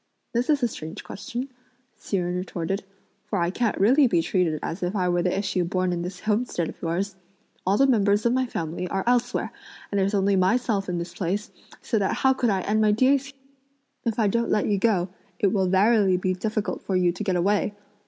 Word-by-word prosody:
"This 240 +4 0
is 290 -4 +3
a - - +4
strange 160 -3 -8
question!" 245 +6 -6 0.5
Hsi 200 - -2
Jen 175 -1 -1
retorted, 180 +1 -3 0.4
"for - - -1
I 170 0 +1
can't 230 +2 0
really 260 +8 +5
be 175 -7 +2
treated 170 -3 +1
as 165 +4 -4
if 180 +3 -2
I 185 -3 +1
were 175 0 +2
the 180 +2 0
issue 195 -2 0
born 185 +1 0
in 170 - -2
this 180 +1 -6
homestead 210 -6 0
of - - -11
yours! 185 +4 -2 0.5
All 195 +2 +3
the 275 - +5
members 210 -4 +3
of 235 - +3
my 260 0 +1
family 170 -3 -4
are 195 +1 -2
elsewhere, 245 0 +1 0.4
and 200 - +1
there's 195 +2 +1
only 200 0 +2
myself 195 +1 +1
in 175 - -1
this 170 0 -5
place, 190 +4 -2 0.3
so 220 - 0
that 195 - 0
how 265 0 +3
could 245 -2 0
I 195 -2 +1
end 215 +3 +1
my 215 -1 +4
days 265 +5 +3
here?" 275 -1 -15 0.6
"If 230 -2 -1
I 220 -3 +3
don't 235 +3 0
let 210 - +2
you 205 -2 +1
go, 190 -5 +2 0.3
it 195 -1 +2
will 190 -3 +2
verily 195 0 +4
be 185 0 0
difficult 215 +2 -2
for 190 - -2
you 180 -1 +3
to 185 +4 -5
get 190 -3 0
away!" 200 +3 +1
195 Hz, 220 wpm, -25 LUFS, 180-225 Hz, 0.6 s, really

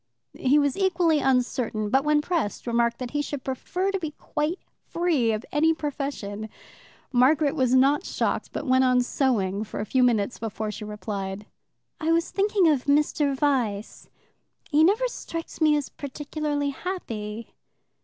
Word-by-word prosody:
He 265 +3 +2
was 285 -2 +2
equally 350 -5 +2
uncertain, 250 -5 0
but 270 +1 +3
when 300 0 +2
pressed 320 - -2
remarked 235 -1 +1
that 250 -2 -5
he 295 - 0
should 285 -2 -5
prefer 360 +9 -2
to 390 - -1
be 320 -4 -3
quite 305 +4 -2 0.3
free 325 -10 +1
of 215 +2 -3
any 320 +2 +3
profession. 275 -9 -4 0.6
Margaret 275 +4 +4
was 255 -1 +2
not 275 +6 +4
shocked, - - -2
but - - -4
went 260 -1 +4
on 250 -1 +4
sewing 215 -7 0
for 220 - -7
a 210 - -2
few 260 +4 +1
minutes 235 -2 +2
before 220 -1 -3
she 210 - -7
replied: 205 -1 -5 0.5
"I 320 0 0
was 335 +1 +1
thinking 400 -2 +2
of 290 -5 +2
Mr. 290 -1 +2
Vyse. 250 -8 -1 0.6
He 305 +1 +5
never 430 +9 +3
strikes 330 -9 -7
me 305 -1 +5
as 290 - -3
particularly 290 +1 -3
happy." 230 - -6
275 Hz, 155 wpm, -25 LUFS, 235-310 Hz, 0.6 s, He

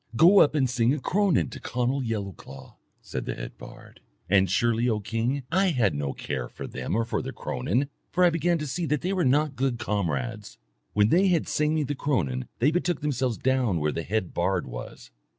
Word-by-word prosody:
Go 175 - +7
up 150 - +5
and 135 -3 +3
sing 125 +2 +2
a - - -4
cronan 175 - +1
to - - -8
Conall 125 +3 -1
Yellowclaw,' 105 -6 -6 0.3
said - - -5
the - - -3
head - - -7
bard. - - -13 0.3
And 95 0 +4
surely, 115 +5 +2
O 110 -2 +1
king, 115 +6 -2
I 190 +3 +3
had 120 - +2
no 70 -1 -2
care - - -4
for - - -8
them 65 +9 -4
or 115 0 +1
for - - -2
their - - -5
cronan, 110 - -1 0.2
for 180 - +2
I 175 - +6
began 170 +1 +1
to 150 - -4
see 165 +4 -2
that 150 0 0
they 185 +2 -1
were 185 -2 +1
not 145 +2 +2
good 130 -2 0
comrades. 90 - -3 0.4
When 105 0 +4
they 185 +7 +4
had 175 -4 +2
sung 150 +1 +1
me 155 - +1
the 145 - -2
cronan 90 - -1
they 135 +6 +3
betook 175 0 0
themselves 130 -5 -1
down 125 -9 +1
where 75 0 0
the 85 - -3
head 100 +1 -2
bard 90 +1 0
was. - - -9
125 Hz, 210 wpm, -26 LUFS, 100-150 Hz, 0.4 s, Go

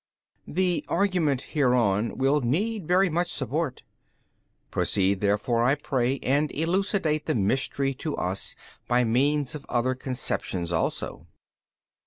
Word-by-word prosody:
B. 180 +1 +1
The - - -29
argument 175 -10 +1
hereon 120 -7 +2
will 135 +3 +2
need 185 - -1
very 185 +2 +4
much 175 +1 -1
support: 140 0 -2 0.9
proceed 95 0 +1
therefore 105 +3 +1
I 130 +4 +4
pray 135 -3 0
and 145 +3 +1
elucidate 165 -2 0
the 155 - +1
Mystery 135 +6 0
to 150 +3 -4
us 95 +2 -2 0.3
by 125 0 +3
means 135 +4 +1
of 150 -2 -7
other 125 +1 +1
conceptions 125 -9 -2
also. 80 - -2
135 Hz, 125 wpm, -26 LUFS, 120-155 Hz, 0.9 s, very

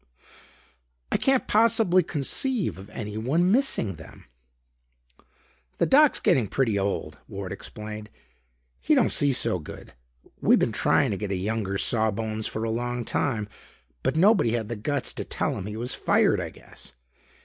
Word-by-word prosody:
"I - - +3
can't 270 -1 +1
possibly 210 -4 +4
conceive 175 - -1
of 100 +2 -11
anyone 115 - -1
missing 215 - +1
them." 80 - -14 1.5
"The - - +2
Doc's 295 +1 +5
getting 120 -5 +2
pretty 110 -3 0
old," 100 0 -3
Ward 95 -1 -6
explained. 105 +1 -8 0.7
"He 65 - +2
don't - - +3
see 145 -1 +3
so 115 -7 0
good. 75 - -11 0.5
We - - +5
been - - +1
trying - - +2
to 100 - -2
get 105 0 -4
a - - 0
younger 100 0 -2
saw 110 +1 +1
bones 110 +1 -3
for 110 - -4
a 115 - -1
long 120 +1 -3
time, 110 -7 -1 0.5
but 130 - -1
nobody 180 - +4
had 110 -3 -2
the 120 - -3
guts 135 +6 -2
to - - -5
tell - - -2
him 95 - -5
he 105 +1 -6
was 120 +2 -4
fired, - - +2
I - - -4
guess. 65 - -14
115 Hz, 160 wpm, -25 LUFS, 105-150 Hz, 1.5 s, Doc's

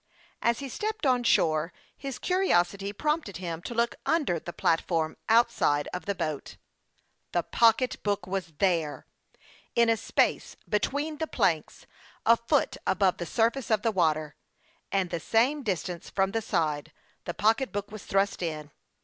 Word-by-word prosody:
As 235 0 +2
he 280 - -5
stepped 420 - -3
on 250 -2 +3
shore, 160 -6 +2 0.2
his 275 -2 -6
curiosity 200 - +1
prompted 300 - -1
him 170 -2 -5
to 235 - -6
look 235 +1 +2
under 295 - +1
the 175 - -7
platform 165 -1 0
outside 225 -11 +3
of 180 - -5
the 200 - 0
boat. 155 -5 -4 0.8
The 175 - +1
pocketbook 225 -4 +2
was 185 -3 -4
there! 165 -5 0 0.7
In 235 -1 +4
a 225 - +2
space - - 0
between 290 +8 -1
the 320 - -1
planks, - - 0 0.4
a 230 - +7
foot 235 +5 0
above 190 -1 +2
the 175 - -5
surface 235 +3 +1
of 215 -2 +2
the 230 - +2
water, 155 -5 +1 0.6
and 190 -3 0
the 170 - -1
same 245 - +2
distance 180 -6 -3
from 195 0 +1
the 225 +1 -1
side, 160 -7 -1 0.3
the 175 - -4
pocketbook 215 -1 +1
was 215 -1 -8
thrust 195 0 0
in. 155 -3 -4
200 Hz, 150 wpm, -28 LUFS, 170-235 Hz, 0.8 s, a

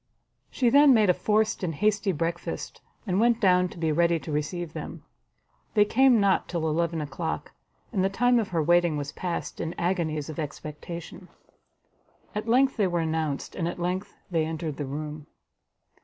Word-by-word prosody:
She 245 -3 +1
then 285 -1 +7
made 210 -4 +5
a - - +1
forced 215 +3 +1
and 170 -4 -2
hasty 205 +3 +1
breakfast, 170 +1 -4 0.2
and 190 -2 0
went 235 0 +3
down 180 -3 +4
to - - -12
be 160 -2 0
ready 170 +2 +3
to 160 - -7
receive 155 +3 -3
them. - - -7 0.7
They 210 -1 +6
came 255 +1 +4
not 200 -2 +2
till 165 -2 -1
eleven 165 +1 0
o'clock, 150 +3 -4 0.4
and 190 -4 +1
the 190 - +2
time 245 +4 +3
of 220 - -1
her 165 -4 0
waiting 175 -1 +3
was 145 0 -4
passed 175 +2 -4
in 165 +1 -4
agonies 170 -4 -1
of 155 0 -6
expectation. 160 +4 -7 1.1
At 210 +2 -4
length 265 +3 +3
they 205 -3 +3
were 175 -1 0
announced, 160 -3 -2
and 170 - -2
at 175 - -4
length 185 +3 -3 0.2
they 165 -2 +2
entered 160 -2 -4
the 145 - -4
room. 150 +1 -6
175 Hz, 175 wpm, -26 LUFS, 160-205 Hz, 1.1 s, then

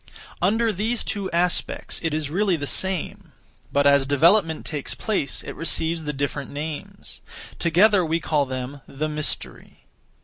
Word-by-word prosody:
Under 220 +5 +2
these 220 +5 0
two 200 -2 -2
aspects, 175 +1 0
it 165 - -1
is 150 -1 -2
really 195 +1 +2
the 145 -3 -4
same; 190 +3 -2 0.4
but 140 0 +2
as 140 -1 +5
development 160 +4 +3
takes 145 -3 -4
place, 195 - -2
it - - -6
receives 165 0 -1
the 150 - -1
different 140 0 -3
names. 150 +1 -7 0.4
Together 185 +4 +4
we 165 0 0
call 150 -3 +1
them 130 +2 -5
the 150 +3 -3
Mystery. 150 -1 -3
160 Hz, 145 wpm, -24 LUFS, 145-185 Hz, 0.4 s, as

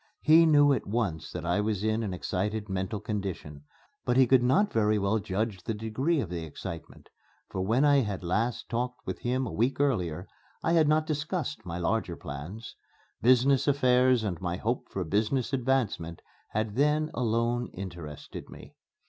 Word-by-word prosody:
He 165 +2 +7
knew 145 -2 +6
at 125 - -2
once 100 -8 -2
that 85 -1 -5
I 90 +4 +1
was 105 -2 -1
in 110 +1 +1
an 105 -4 -3
excited 105 +4 -2
mental 95 +2 -2
condition. 95 -9 -5 0.4
But 125 0 +1
he 130 - +7
could 130 0 +5
not 195 +12 +2
very 110 -1 +3
well 100 +2 +1
judge 100 0 -2
the 110 +5 -3
degree 130 +10 0
of 100 -10 -3
the 85 -2 -3
excitement; 80 +1 -8 0.4
for 95 - -2
when 115 +9 +2
I 145 -1 +5
had 105 -8 -1
last 110 +7 -1
talked 125 +1 -3
with - - -4
him 130 +2 -1
a - - -5
week 125 +6 0
earlier, 95 - 0 0.4
I 165 - +2
had 160 -3 +4
not 155 +1 +3
discussed 155 - -3
my 85 0 -4
larger 85 -2 -1
plans. 85 - -8 0.5
Business 130 +3 +4
affairs 130 -3 +4
and 90 -6 -3
my 90 -1 -2
hope 115 +5 -2
for 95 - -3
business 110 - 0
advancement 120 -11 -1 0.3
had 110 +1 -2
then 150 +2 +2
alone 120 0 0
interested 85 -6 -8
me. - - -12
110 Hz, 175 wpm, -28 LUFS, 95-130 Hz, 0.5 s, He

